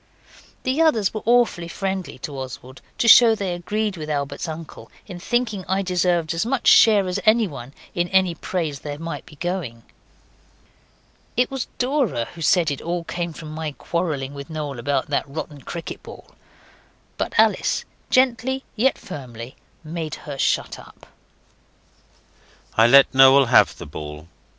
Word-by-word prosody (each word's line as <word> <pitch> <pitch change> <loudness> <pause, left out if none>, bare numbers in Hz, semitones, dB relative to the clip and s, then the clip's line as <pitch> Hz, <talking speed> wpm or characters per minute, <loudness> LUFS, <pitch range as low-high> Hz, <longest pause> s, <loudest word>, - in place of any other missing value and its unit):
The 260 +5 0
others 230 -12 +3
were 215 - -4
awfully 235 -8 +3
friendly 190 -1 -4
to 145 - -5
Oswald, 130 0 -8 0.2
to 235 - +1
show 230 -1 +8
they 195 -4 -3
agreed 205 +3 -2
with 155 -1 -6
Albert's 140 0 -3
uncle 160 0 -8 0.2
in 180 -4 -9
thinking 225 -1 -1
I 190 +2 0
deserved 180 -3 0
as 165 +3 0
much 245 +2 -1
share 205 -4 +6
as 180 +2 -2
anyone 195 - +1 0.2
in 175 0 0
any 190 -1 +2
praise 160 -3 -3
there 145 -1 -6
might 165 -2 -6
be 150 - -14
going. 155 -9 -4 1.5
It 250 +1 +2
was 270 -2 -3
Dora 250 - 0
who 170 - -11
said 165 -1 +3
it 140 - -4
all 170 0 -3
came 170 0 -4
from 155 0 -9
my 155 -1 -4
quarrelling 150 -5 -3
with 140 +1 -9
Noel 150 -5 -5
about 140 +3 -1
that 140 - -1
rotten 145 -1 -7
cricket 170 +5 -7
ball; - - -13 0.9
but - - -2
Alice, - - +2 0.2
gently 260 +1 +2
yet 255 +4 +2
firmly, 130 - -9 0.3
made 160 -1 -5
her 140 -2 -6
shut - - 0
up. - - -16 1.7
I 115 +1 +6
let 140 +3 +6
Noel 135 +1 +7
have 115 - +4
the - - -8
ball. 75 +1 -8
170 Hz, 155 wpm, -22 LUFS, 140-205 Hz, 1.7 s, show